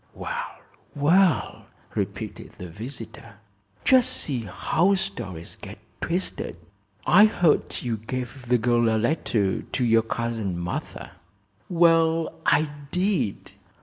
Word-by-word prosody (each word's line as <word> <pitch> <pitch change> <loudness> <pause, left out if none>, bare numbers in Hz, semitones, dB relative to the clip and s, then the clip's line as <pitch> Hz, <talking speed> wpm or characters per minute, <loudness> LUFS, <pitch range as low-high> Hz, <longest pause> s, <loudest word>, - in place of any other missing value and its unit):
"Well, - - -5 0.4
well!" 165 +5 +3 0.3
repeated - - -4
the 90 - -8
visitor. 115 - -9 0.5
"Just 255 -2 +5
see 120 -8 -3
how 185 - +2
stories 95 - -5
get 105 +1 -8 0.2
twisted. 170 - -2 0.5
I 205 +5 +7
heard 175 -7 +1
you 120 -3 -1
gave 125 +3 -6
the 125 +1 +4
girl 120 0 +2
a 110 - +2
letter 110 - 0
to 130 - -3
your 115 -1 +5
cousin 115 -5 -3
Martha." 85 0 -5 0.6
"Well, 165 -2 +3
I 150 0 +3 0.2
did. 180 - -1
125 Hz, 115 wpm, -25 LUFS, 110-165 Hz, 0.6 s, I